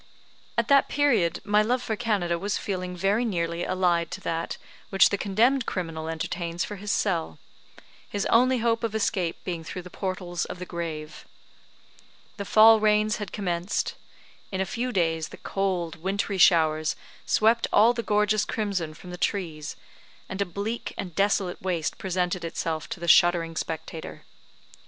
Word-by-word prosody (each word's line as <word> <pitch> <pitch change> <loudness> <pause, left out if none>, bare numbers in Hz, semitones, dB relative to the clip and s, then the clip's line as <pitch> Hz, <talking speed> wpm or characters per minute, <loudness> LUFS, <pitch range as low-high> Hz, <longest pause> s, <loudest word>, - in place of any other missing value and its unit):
At - - +2
that 280 -1 +5
period 240 - +2
my 210 +1 +3
love 245 +3 0
for 220 - -2
Canada 195 -6 0
was 200 +3 -1
a - - -5
feeling 185 -2 -4
very 200 +6 +2
nearly 170 -5 -1
allied 175 -3 +1
to - - -7
that 165 0 -3 0.3
which 195 - +5
the - - 0
condemned 230 +6 +2
criminal 165 -3 -3
entertains 170 +2 -3
for 205 - -7
his 205 +2 -3
cell 165 - 0 0.7
his 200 -1 -2
only 255 +2 +4
hope 230 0 +1
of 225 -1 -2
escape 185 -5 0
being 170 -3 -4
through 180 +2 -6
the 180 - -11
portals 185 -2 -3
of - - -7
the 180 - -6
grave. 160 -3 -6 1.1
The 200 - -4
fall 220 +2 +7
rains 215 0 +3
had 205 -4 -6
commenced. 180 -2 -2 0.6
In 190 - -3
a 190 - +1
few 245 +6 -3
days 165 -5 0
the - - -11
cold 185 -4 -2
wintry 195 +3 -2
showers 155 -3 +4 0.3
swept 225 +2 +3
all 230 +3 +6
the 235 - -2
gorgeous 210 -1 +2
crimson 195 -9 -2
from 180 +3 -11
the 180 - -8
trees; 160 -7 -2 0.5
and 190 +1 -4
a - - +2
bleak 200 +6 -4
and 190 -5 -5
desolate 195 -1 0
waste 170 -5 -2
presented 180 -1 -1
itself 165 -1 -3
to - - -5
the 170 - -5
shuddering 170 -1 +5
spectator. 160 0 -5
185 Hz, 165 wpm, -26 LUFS, 170-210 Hz, 1.1 s, fall